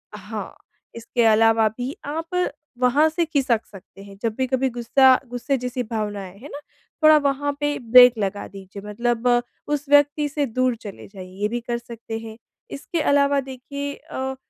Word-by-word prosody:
हाँ, -, -, -7 dB, 0.4 s
इसके 235 Hz, +1 st, -1 dB
अलावा 225 Hz, 0 st, +4 dB
भी 255 Hz, +3 st, -4 dB
आप 330 Hz, +5 st, -2 dB, 0.3 s
वहाँ 260 Hz, +5 st, +4 dB
से 330 Hz, +2 st, 0 dB
खिसक 270 Hz, -8 st, +1 dB
सकते 195 Hz, 0 st, -14 dB
हैं 200 Hz, 0 st, -13 dB
जब 230 Hz, -2 st, -1 dB
भी 260 Hz, -, +1 dB
कभी 260 Hz, +1 st, 0 dB
गुस्सा 255 Hz, +2 st, +4 dB
गुस्से 245 Hz, +3 st, -2 dB
जैसी 250 Hz, 0 st, -3 dB
भावना 215 Hz, -3 st, -3 dB
आए, 190 Hz, +1 st, -11 dB
हैं 275 Hz, +7 st, -11 dB
ना? 285 Hz, -, -7 dB, 0.4 s
थोड़ा 310 Hz, 0 st, +8 dB
वहाँ 285 Hz, 0 st, 0 dB
पे 290 Hz, 0 st, -1 dB
ब्रेक 250 Hz, -1 st, +9 dB
लगा 205 Hz, 0 st, -3 dB
दीजिए 195 Hz, 0 st, -11 dB
मतलब, 235 Hz, +3 st, -1 dB, 0.4 s
उस 295 Hz, -1 st, -2 dB
व्यक्ति 290 Hz, +1 st, +4 dB
से 290 Hz, 0 st, -1 dB
दूर 255 Hz, 0 st, 0 dB
चले 200 Hz, -2 st, -9 dB
जाइए 185 Hz, -2 st, -11 dB
ये 210 Hz, -, +2 dB
भी 240 Hz, +3 st, -3 dB
कर 235 Hz, 0 st, -3 dB
सकते 230 Hz, -1 st, -8 dB
हैं। 225 Hz, 0 st, -10 dB, 0.4 s
इसके 320 Hz, +4 st, -4 dB
अलावा 280 Hz, 0 st, +3 dB
देखिए 280 Hz, +2 st, -6 dB
अ, 265 Hz, 0 st, -5 dB
250 Hz, 175 wpm, -22 LUFS, 225-285 Hz, 0.4 s, ब्रेक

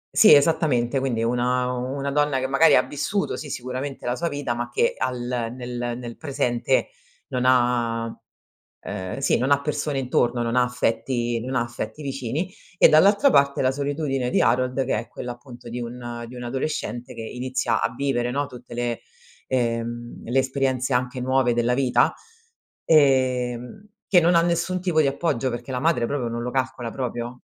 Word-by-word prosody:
Sì, 215 Hz, -, +8 dB
esattamente, 140 Hz, -4 st, +2 dB
quindi 120 Hz, -4 st, -1 dB
una 125 Hz, +2 st, +1 dB
una 135 Hz, +3 st, -3 dB
donna 145 Hz, -1 st, +2 dB
che 130 Hz, -, -1 dB
magari 140 Hz, +3 st, +5 dB
ha -, -, +5 dB
vissuto, 195 Hz, +7 st, -2 dB
sì, 150 Hz, -, -7 dB
sicuramente 130 Hz, +2 st, -5 dB
la 120 Hz, 0 st, 0 dB
sua 170 Hz, -, -2 dB
vita, 145 Hz, -4 st, -2 dB
ma 120 Hz, 0 st, -4 dB
che 120 Hz, -, +1 dB
al 130 Hz, -1 st, -2 dB, 0.4 s
nel 120 Hz, -1 st, -4 dB
nel 120 Hz, -2 st, -8 dB
presente 135 Hz, -, 0 dB, 0.4 s
non 125 Hz, -2 st, -1 dB
ha 120 Hz, -2 st, +2 dB, 0.8 s
uhm 95 Hz, 0 st, -5 dB
sì, 135 Hz, -, +2 dB
non 130 Hz, +3 st, 0 dB
ha 140 Hz, -, +5 dB
persone 145 Hz, -1 st, -2 dB
intorno, 125 Hz, -1 st, +1 dB
non 115 Hz, 0 st, -1 dB
ha 125 Hz, -, +5 dB
affetti, 120 Hz, -1 st, -1 dB
non 130 Hz, +1 st, -4 dB
ha 120 Hz, -, +2 dB
affetti 120 Hz, +5 st, -6 dB
vicini; 135 Hz, +4 st, -3 dB, 0.3 s
e -, -, +8 dB
dall'altra 200 Hz, -, +5 dB
parte 140 Hz, -, +3 dB
la 130 Hz, 0 st, +2 dB
solitudine 140 Hz, -2 st, -1 dB
di -, -, +2 dB
Harold 130 Hz, +2 st, +1 dB
che 135 Hz, -, 0 dB
è 115 Hz, -, -9 dB
quella 120 Hz, 0 st, -6 dB
appunto 120 Hz, -1 st, -13 dB
di 120 Hz, +1 st, -5 dB
un 120 Hz, 0 st, -6 dB
di 125 Hz, -, -10 dB
un 125 Hz, -, -7 dB
adolescente 125 Hz, -1 st, -3 dB
che 115 Hz, -, -7 dB
inizia 125 Hz, 0 st, -1 dB
a -, -, 0 dB
vivere 120 Hz, -2 st, -1 dB
no, 145 Hz, +2 st, 0 dB
tutte 125 Hz, -2 st, -12 dB
le 120 Hz, -1 st, -2 dB, 0.5 s
ehm, 120 Hz, -1 st, -2 dB
le 125 Hz, +3 st, +1 dB
esperienze, 130 Hz, -1 st, 0 dB
anche 125 Hz, +1 st, -1 dB
nuove, 130 Hz, -1 st, +2 dB
della 120 Hz, +1 st, +1 dB
vita, 125 Hz, -1 st, +3 dB, 0.7 s
ehm, 130 Hz, -, +2 dB, 0.2 s
che 180 Hz, -3 st, +5 dB
non 170 Hz, +1 st, +4 dB
ha 170 Hz, -, +6 dB
nessun 170 Hz, +2 st, 0 dB
tipo 175 Hz, -4 st, +2 dB
di 145 Hz, -, +2 dB
appoggio, 135 Hz, -2 st, 0 dB
perché 120 Hz, +2 st, -6 dB
la 125 Hz, -, -2 dB
madre 155 Hz, -6 st, +2 dB
proprio 125 Hz, -2 st, -2 dB
non 120 Hz, 0 st, -4 dB
lo 125 Hz, +1 st, -3 dB
calcola 130 Hz, -2 st, -2 dB
proprio. 120 Hz, 0 st, -5 dB
125 Hz, 180 wpm, -24 LUFS, 120-140 Hz, 0.8 s, Sì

